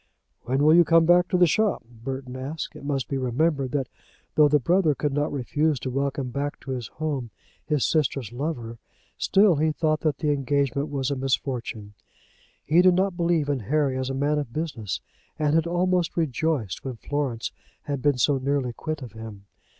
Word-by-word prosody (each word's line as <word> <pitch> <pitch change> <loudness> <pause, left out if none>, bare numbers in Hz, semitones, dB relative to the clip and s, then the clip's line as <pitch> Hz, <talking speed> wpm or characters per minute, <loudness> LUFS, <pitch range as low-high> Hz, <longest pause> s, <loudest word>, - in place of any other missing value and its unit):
"When 130 +3 +1
will 155 +1 +6
you 175 +1 +7
come 165 0 +4
back 175 +1 +5
to 180 - +1
the 180 - +6
shop?" 215 - +1
Burton 125 +2 -7
asked. 140 +5 -5
It - - -10
must 140 -3 -2
be 135 - -2
remembered 135 +2 0
that 135 -3 0 0.5
though 150 -1 +6
the 150 +1 +4
brother 160 +2 +2
could 145 0 -1
not 145 +2 0
refuse 145 +2 0
to 130 - -3
welcome 135 -1 -2
back 140 +3 -3
to 135 - -6
his 125 -3 -3
home 145 -6 -3 0.4
his 150 -4 +1
sister's 135 -7 0
lover, 120 -5 -4 0.4
still 195 -4 +4
he 155 +2 +2
thought 155 0 0
that 150 -4 0
the 150 0 0
engagement 140 0 0
was 140 -1 -1
a - - 0
misfortune. 125 -5 -2 0.7
He 165 +4 +5
did 180 -1 +5
not 190 0 +1
believe 170 -4 +1
in 145 -2 0
Harry 135 +4 0
as 130 0 -2
a 135 - -2
man 145 +2 +1
of 140 -5 -5
business, 130 - -3 0.4
and 150 -1 +1
had 165 +1 +3
almost 175 0 +1
rejoiced 150 - -1
when 130 -2 -4
Florence 130 -2 -3 0.3
had 140 -2 -3
been 145 -2 +2
so 135 +3 +2
nearly 135 -2 -1
quit 155 +2 -5
of 120 - -8
him. 110 -2 -10
145 Hz, 190 wpm, -25 LUFS, 130-155 Hz, 0.7 s, you